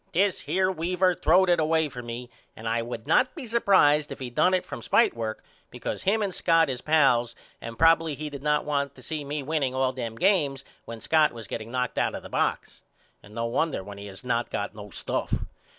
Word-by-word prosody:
This 190 Hz, +3 st, +2 dB
here 190 Hz, 0 st, 0 dB
Weaver 180 Hz, +2 st, +1 dB
throwed 180 Hz, +3 st, +3 dB
it 175 Hz, -1 st, +3 dB
away 160 Hz, 0 st, +2 dB
for 125 Hz, -3 st, -8 dB
me 120 Hz, +1 st, -7 dB, 0.2 s
and 110 Hz, -, -7 dB
I 115 Hz, +1 st, +1 dB
would 115 Hz, -1 st, -6 dB
not 255 Hz, 0 st, +2 dB
be 300 Hz, -6 st, -7 dB
surprised 190 Hz, -10 st, +3 dB
if -, -, -5 dB
he 130 Hz, -3 st, -6 dB
done 180 Hz, +9 st, +3 dB
it 185 Hz, -, -1 dB
from 190 Hz, -, -7 dB
spitework 115 Hz, -, +1 dB, 0.3 s
because -, -, -5 dB
him 210 Hz, +3 st, +1 dB
and 195 Hz, -2 st, -2 dB
Scott 165 Hz, -5 st, +3 dB
is 125 Hz, -, -5 dB
pals 125 Hz, -7 st, +3 dB, 0.3 s
and 115 Hz, 0 st, -7 dB
probily 165 Hz, -1 st, +4 dB
he 155 Hz, +2 st, -5 dB
did 140 Hz, -2 st, -7 dB
not 150 Hz, +1 st, +1 dB
want 140 Hz, -2 st, -1 dB
to 130 Hz, -, -14 dB
see 155 Hz, +3 st, -4 dB
me 145 Hz, 0 st, -4 dB
winning 140 Hz, -3 st, -1 dB
all 130 Hz, 0 st, +1 dB
them 120 Hz, -3 st, -5 dB
games 150 Hz, -, +1 dB, 0.2 s
when 115 Hz, -1 st, -8 dB
Scott 155 Hz, -3 st, +3 dB
was 115 Hz, -2 st, -8 dB
getting 110 Hz, +3 st, -6 dB
knocked 125 Hz, 0 st, -2 dB
out -, -, 0 dB
of -, -, -7 dB
the -, -, -10 dB
box. -, -, -2 dB, 0.4 s
And 105 Hz, +1 st, -15 dB
no 115 Hz, 0 st, -1 dB
wonder 130 Hz, -1 st, -1 dB
when 100 Hz, +1 st, -9 dB
he 100 Hz, -, -8 dB
has 95 Hz, +2 st, -10 dB
not 120 Hz, -1 st, -1 dB
got 100 Hz, -, -3 dB
no 105 Hz, -1 st, -10 dB
stuff. -, -, -2 dB
145 Hz, 220 wpm, -26 LUFS, 120-165 Hz, 0.4 s, probily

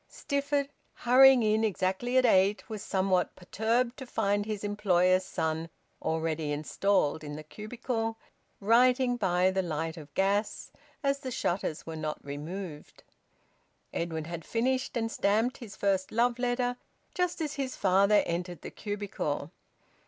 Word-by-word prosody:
Stifford, 280 Hz, 0 st, -1 dB, 0.3 s
hurrying 255 Hz, 0 st, +6 dB
in 215 Hz, +1 st, +2 dB
exactly 210 Hz, +4 st, 0 dB
at 255 Hz, -, +5 dB
eight, 195 Hz, -3 st, +3 dB
was 215 Hz, -2 st, -6 dB
somewhat 185 Hz, -3 st, 0 dB
perturbed 230 Hz, +6 st, 0 dB
to 265 Hz, -, -8 dB
find 205 Hz, -2 st, 0 dB
his 210 Hz, -2 st, -4 dB
employer's 185 Hz, -3 st, +2 dB
son 160 Hz, -3 st, -2 dB, 0.3 s
already 160 Hz, -1 st, -1 dB
installed 155 Hz, +1 st, 0 dB
in 145 Hz, -1 st, -6 dB
the 155 Hz, -, -7 dB
cubicle, 225 Hz, -, -4 dB, 0.4 s
writing 245 Hz, +4 st, +4 dB
by 185 Hz, -4 st, +2 dB
the 190 Hz, 0 st, +1 dB
light 160 Hz, -1 st, -3 dB
of 150 Hz, -2 st, -11 dB
gas, 200 Hz, +2 st, 0 dB, 0.3 s
as 275 Hz, 0 st, +1 dB
the 265 Hz, -2 st, -5 dB
shutters 175 Hz, -8 st, -2 dB
were 160 Hz, -, -6 dB
not 155 Hz, -1 st, -3 dB
removed. 150 Hz, +3 st, -7 dB, 0.9 s
Edwin 160 Hz, -2 st, -3 dB
had 170 Hz, 0 st, -6 dB
finished 255 Hz, +4 st, -1 dB
and 225 Hz, -1 st, -1 dB
stamped 220 Hz, +6 st, +1 dB
his 215 Hz, -5 st, -10 dB
first 195 Hz, -2 st, 0 dB
love 240 Hz, +1 st, +2 dB
letter 245 Hz, 0 st, 0 dB, 0.4 s
just 360 Hz, -1 st, -1 dB
as 305 Hz, -2 st, -2 dB
his 270 Hz, -3 st, -3 dB
father 200 Hz, +2 st, +4 dB
entered 175 Hz, 0 st, -4 dB
the -, -, -7 dB
cubicle. 200 Hz, -8 st, -4 dB
200 Hz, 140 wpm, -29 LUFS, 175-245 Hz, 0.9 s, hurrying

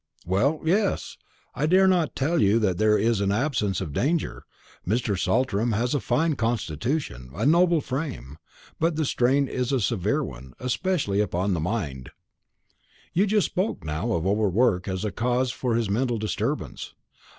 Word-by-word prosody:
"Well, 130 Hz, -, +1 dB
yes; 195 Hz, +4 st, 0 dB, 0.4 s
I 150 Hz, -, 0 dB
dare 190 Hz, +3 st, +5 dB
not 180 Hz, -5 st, +2 dB
tell 160 Hz, +5 st, +1 dB
you 100 Hz, +3 st, +4 dB
that 100 Hz, -5 st, 0 dB
there 110 Hz, 0 st, +4 dB
is 115 Hz, -2 st, +1 dB
an 100 Hz, 0 st, +1 dB
absence 105 Hz, -4 st, 0 dB
of 80 Hz, -6 st, -5 dB
danger. 155 Hz, -, -1 dB, 0.4 s
Mr. 110 Hz, +1 st, 0 dB
Saltram 110 Hz, +4 st, +1 dB
has 120 Hz, +5 st, 0 dB
a 145 Hz, -, +1 dB
fine 150 Hz, +6 st, +1 dB
constitution, 115 Hz, -, -2 dB
a -, -, -1 dB
noble 170 Hz, +1 st, +4 dB
frame; 125 Hz, -, -5 dB, 0.4 s
but 165 Hz, 0 st, +1 dB
the 155 Hz, 0 st, 0 dB
strain 135 Hz, +2 st, +2 dB
is 125 Hz, 0 st, -2 dB
a 135 Hz, -, +2 dB
severe 105 Hz, -3 st, 0 dB
one, 65 Hz, 0 st, -9 dB
especially 125 Hz, -, 0 dB
upon 95 Hz, -1 st, 0 dB
the 85 Hz, -, -1 dB
mind." 75 Hz, -, -3 dB, 1.0 s
"You 195 Hz, +5 st, +3 dB
spoke 195 Hz, +1 st, -1 dB
just -, -, -14 dB
now 80 Hz, +10 st, -2 dB
of 85 Hz, -2 st, -1 dB
over 105 Hz, +1 st, +2 dB
work 100 Hz, -2 st, +2 dB
as 95 Hz, +2 st, -2 dB
a 105 Hz, -, -1 dB
cause 125 Hz, +5 st, 0 dB
for 125 Hz, -3 st, -1 dB
this 115 Hz, -2 st, 0 dB
mental 120 Hz, +4 st, 0 dB
disturbance. 110 Hz, 0 st, -3 dB
115 Hz, 165 wpm, -25 LUFS, 100-140 Hz, 1.0 s, dare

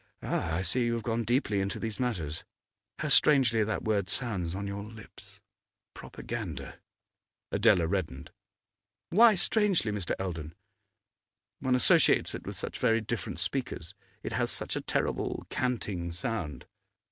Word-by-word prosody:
Ah, 80 Hz, -1 st, -1 dB
I 90 Hz, -, 0 dB
see 120 Hz, +7 st, +1 dB
you 115 Hz, -, +1 dB
have 115 Hz, -, -4 dB
gone 115 Hz, +1 st, 0 dB
deeply 115 Hz, -4 st, +1 dB
into 95 Hz, +1 st, -2 dB
these 110 Hz, -2 st, -4 dB
matters. 90 Hz, -, -2 dB, 0.5 s
How -, -, -2 dB
strangely 125 Hz, -7 st, +5 dB
that 105 Hz, -2 st, -2 dB
word 100 Hz, -4 st, 0 dB
sounds 95 Hz, -6 st, -1 dB
on 100 Hz, +1 st, -4 dB
your 100 Hz, 0 st, -4 dB
lips 110 Hz, 0 st, -11 dB, 0.5 s
propaganda!' -, -, -6 dB, 0.7 s
Adela 85 Hz, -, +4 dB
reddened. 80 Hz, -4 st, -3 dB, 0.8 s
'Why 220 Hz, +4 st, +7 dB
strangely, 190 Hz, -, +2 dB
Mr. 100 Hz, -4 st, -2 dB
Eldon?' 80 Hz, -4 st, -5 dB, 1.0 s
'One 130 Hz, -2 st, +2 dB
associates 125 Hz, -, +4 dB
it -, -, -7 dB
with -, -, -5 dB
such -, -, -5 dB
very 115 Hz, 0 st, +3 dB
different 110 Hz, +2 st, -4 dB
speakers; 100 Hz, -10 st, -3 dB, 0.3 s
it -, -, -4 dB
has -, -, 0 dB
such -, -, +2 dB
a -, -, -2 dB
terrible -, -, -1 dB
canting 100 Hz, -9 st, -2 dB
sound. 85 Hz, -, -4 dB
105 Hz, 140 wpm, -30 LUFS, 90-120 Hz, 1.0 s, Why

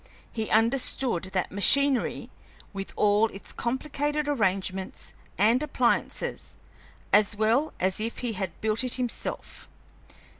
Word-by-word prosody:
He 220 Hz, -2 st, -3 dB
understood 230 Hz, -3 st, +1 dB
that 185 Hz, -1 st, -2 dB
machinery, 270 Hz, +6 st, +3 dB, 0.4 s
with 195 Hz, -1 st, -6 dB
all 210 Hz, +1 st, +3 dB
its 200 Hz, -2 st, -8 dB
complicated 290 Hz, +4 st, -2 dB
arrangements 190 Hz, -7 st, -1 dB, 0.2 s
and 225 Hz, +6 st, +4 dB
appliances, 255 Hz, -5 st, -1 dB, 0.6 s
as 205 Hz, +1 st, +4 dB
well 225 Hz, +8 st, +1 dB
as 185 Hz, +2 st, 0 dB
if 225 Hz, +2 st, -4 dB
he 240 Hz, -3 st, -3 dB
had 190 Hz, -3 st, -5 dB
built 220 Hz, +2 st, 0 dB
it 255 Hz, -, -1 dB
himself. 250 Hz, -2 st, -4 dB
225 Hz, 115 wpm, -27 LUFS, 200-255 Hz, 0.6 s, and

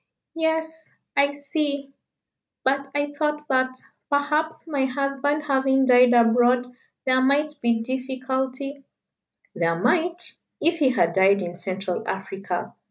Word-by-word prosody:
"Yes 320 Hz, -1 st, -2 dB, 0.2 s
I 280 Hz, 0 st, +4 dB
see 285 Hz, -1 st, -3 dB, 0.7 s
but 275 Hz, +1 st, +1 dB
I 290 Hz, 0 st, -1 dB
thought 300 Hz, 0 st, -2 dB
that, 260 Hz, -1 st, +1 dB, 0.3 s
perhaps, 300 Hz, +3 st, 0 dB
my 285 Hz, -5 st, 0 dB
husband 275 Hz, +2 st, -1 dB
having 270 Hz, -1 st, +2 dB
died 250 Hz, -1 st, +6 dB
abroad 240 Hz, +1 st, +4 dB, 0.4 s
there 260 Hz, 0 st, +3 dB
might 290 Hz, +3 st, +2 dB
be 235 Hz, -1 st, +1 dB
difficulty 260 Hz, +2 st, -3 dB, 0.4 s
" -, -, -43 dB
"There 165 Hz, -1 st, 0 dB
might, 340 Hz, -, 0 dB, 0.3 s
if 335 Hz, 0 st, +1 dB
he 280 Hz, -4 st, +4 dB
had 170 Hz, -10 st, +2 dB
died 195 Hz, +1 st, +4 dB
in 175 Hz, 0 st, -5 dB
Central 185 Hz, 0 st, -4 dB
Africa. 195 Hz, +1 st, -4 dB
270 Hz, 125 wpm, -24 LUFS, 245-290 Hz, 0.7 s, died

